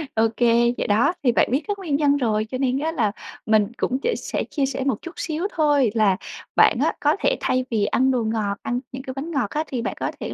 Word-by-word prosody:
Ô 225 0 +4
kê, 235 0 +3
vậy - - -2
đó, 215 +11 +3
thì 250 - +4
bạn - - +3
biết 270 +5 +1
các 410 -1 -2
nguyên 325 -7 -1
nhân 285 -1 +3
rồi 215 -5 0
cho 255 - -3
nên 260 0 0
á 315 +3 -1
là 230 -10 0 0.3
mình 215 -2 +3
cũng 255 - 0
sẽ 480 - +1
sẽ - - -3
chia 280 -3 +1
sẻ 270 0 -3
một 265 -6 +1
chút 340 - -8
xíu 325 +4 -2
thôi, 290 -7 +3
là 205 -4 +3 0.4
bạn - - +5
á - - +2
có - - +2
thể - - +1
thay 255 0 0
vì 215 -3 +1
ăn 260 +5 +2
đồ 250 -3 0
ngọt, 215 -2 -1
ăn 245 +1 -1
những 260 +1 -7
cái 260 - -6
bánh 295 +5 -5
ngọt 270 -10 0
á, 305 - -1
thì 250 -3 -3
bạn - - -3
có - - -1
thể - - -4
255 Hz, 260 wpm, -23 LUFS, 225-285 Hz, 0.4 s, bạn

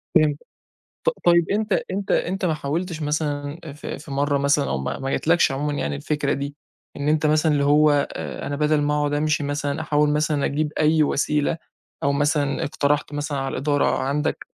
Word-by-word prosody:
فهمتك، 155 -2 +3 0.6
ط - - +4 0.2
طيب 170 -1 +4
أنت 210 0 0 0.2
أنت 195 +1 -2
أنت 190 +2 0
ما 160 - +2
حاولتش 160 +3 -3
مثلًا 150 0 -2
في 150 - -7
في 150 -1 -11
مَرّة 140 +1 +1
مثلًا 140 +1 +2
أو 70 - 0
ما 70 - -3
ما 135 - -3
جاتلكش 165 +3 +2
عمومًا 145 +2 -2
يعني 75 - -2
الفكرة 145 - -1
دي، 140 +1 -4 0.4
إن 145 - -3
أنت 155 0 +2
مثلًا 155 +1 +3
اللي 145 -1 +2
هو 150 +1 +5 0.2
آآ - - -6
أنا 145 - -2
بَدَل 150 0 +2
ما 145 0 +1
أقعد 145 0 0
أمْشي 150 0 +1
مثلًا 145 +1 -2
أحاول 150 -1 +2
مثلًا 150 -1 +1
أجيب 150 +1 -1
أي 155 0 +4
وسيلة؟ 150 +2 0 0.5
أو 140 - +3
مثلًا 145 0 +1
اقترحت 145 0 0
مثلًا 145 0 -3
على 135 0 -3
الإدارة 145 +2 +1
عندك 140 +3 -1
150 Hz, 185 wpm, -23 LUFS, 145-155 Hz, 0.6 s, هو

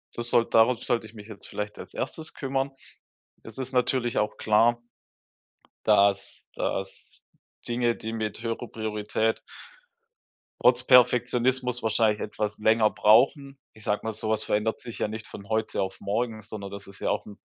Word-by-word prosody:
das 120 0 -2
soll 115 - +3
darauf 115 +1 +4
sollte 115 -2 0
ich 110 - -13
mich 105 -2 -11
jetzt 110 -3 -10
vielleicht 105 0 -5
als - - -10
1. 155 +4 -4
kümmern.“ 135 0 -2 0.7
Das 115 - -12
ist 130 - -4
natürlich 125 -1 +1
auch 105 - 0
klar 115 +2 +3 1.0
dass 100 -2 +2
dass 95 0 -3 0.6
Dinge, 120 -1 +1
die 110 +1 -6
mit 110 -1 -3
höherer 115 +1 -3
Priorität 110 0 -1 1.2
trotz 125 0 +4
Perfektionismus 125 0 +3
wahrscheinlich 110 -1 +2
etwas 105 0 -3
länger 110 0 +4
brauchen. 135 +5 +3 0.2
Ich 110 - -16
sage 105 - 0
mal, 110 - -3
sowas 110 0 -1
verändert 105 +2 0
sich 120 - -8
ja - - +1
nicht 110 0 -6
von 100 0 -11
heute 110 0 0
auf 95 0 -4
morgen, 110 +2 -2
sondern 105 -2 -7
das 100 0 -8
ist 100 0 -13
ja - - -1
auch - - -1
'n 105 - -12
110 Hz, 160 wpm, -26 LUFS, 105-120 Hz, 1.2 s, darauf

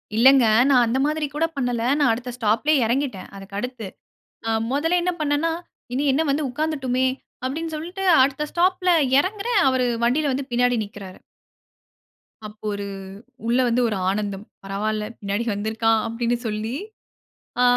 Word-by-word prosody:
இல்லங்க, 260 +1 +6 0.2
நான் 250 -3 +5
அந்த 235 - 0
மாதிரி 305 0 0
கூட 325 +2 +2
பண்ணல்ல. 245 -3 -1 0.2
நான் 285 -6 +4
அடுத்த 245 +2 -5
ஸ்டாப்‌லேயே 235 +6 +2
இறங்கிட்டேன். 250 -4 -2
அதுக்கு 195 0 -10
அடுத்து. 250 -4 -5 0.6
ஆ - - 0 0.2
1ல 325 +6 +2
என்ன 360 - +1
பண்னேன்னா, 295 +2 +1 0.4
இனி 275 +3 0
என்ன 300 - +2
வந்து 290 +2 +1
உட்காந்துட்டோமே 260 -3 -1 0.4
அப்டீன்னு, 320 +4 -3
சொல்லிட்டு 355 +5 -5 0.2
அடுத்த 280 +2 -1
ஸ்டாப்‌ல 365 +1 +2 0.3
இறங்குறேன். 410 +5 0
அவர் 260 -1 +1 0.2
வண்டியில 280 +4 +2
வந்து 270 0 -4
பின்னாடி 245 0 +2
நிக்குறாரு. 200 -2 -10 1.3
அப்ப 210 0 -15
ஒரு 200 0 -4 0.6
உள்ள 240 +2 +2
வந்து 240 +1 +2
ஒரு 210 - -2
ஆனந்தம். 200 0 -3 0.2
பரவால்ல. 210 +2 -2 0.2
பின்னாடி 205 +3 -2
வந்து 205 +2 -3
இருக்கான் 225 0 +2
அப்படினு 235 +1 -1
சொல்லி, 215 +3 -3 0.9
ஆ - - +5
250 Hz, 145 wpm, -23 LUFS, 220-300 Hz, 1.3 s, இல்லங்க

